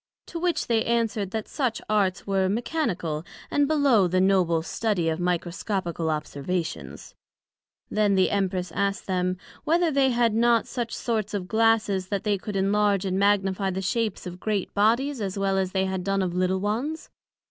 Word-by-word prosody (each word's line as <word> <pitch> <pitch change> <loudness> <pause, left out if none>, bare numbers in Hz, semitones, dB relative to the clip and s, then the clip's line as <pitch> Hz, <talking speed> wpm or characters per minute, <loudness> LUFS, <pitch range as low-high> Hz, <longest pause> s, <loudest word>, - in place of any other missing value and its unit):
To 335 - -6
which 350 0 0
they 225 -2 +1
answered, 225 -4 0
That 220 +2 -4
such 255 -6 -1
Arts 195 -4 +1
were 195 -1 +1
mechanical 195 - -2 0.3
and 290 -1 +3
below 275 -10 +4
the 185 +1 +1
noble 185 -4 +3
study 185 -3 0
of 160 +1 -2
Microscopical 175 -1 -2
observations. 150 - -4 0.8
Then 210 -2 +2
the 190 -1 +3
Empress 185 -3 -1
asked 200 +2 -1
them, 185 -1 0 0.3
Whether 335 +1 +2
they 275 -2 +3
had 235 -2 +2
not 235 0 +3
such 240 -3 -4
sorts 215 -3 -2
of 185 -3 -3
Glasses 220 -4 +2
that 200 0 -2 0.2
could 210 - -5
enlarge 200 0 +2
and 190 0 0
magnifie 195 -1 +2
the 190 0 -3
shapes 220 0 -1
of 180 0 -7
great 205 -1 -2
Bodies 235 +6 +2
as 195 -1 -3
well 195 -1 +1
as 190 -1 0
they 190 0 +1
had 190 -1 -2
done 195 0 0
of 180 -2 -2
little 185 +1 +1
ones? 240 +11 -3
195 Hz, 170 wpm, -25 LUFS, 185-225 Hz, 0.8 s, below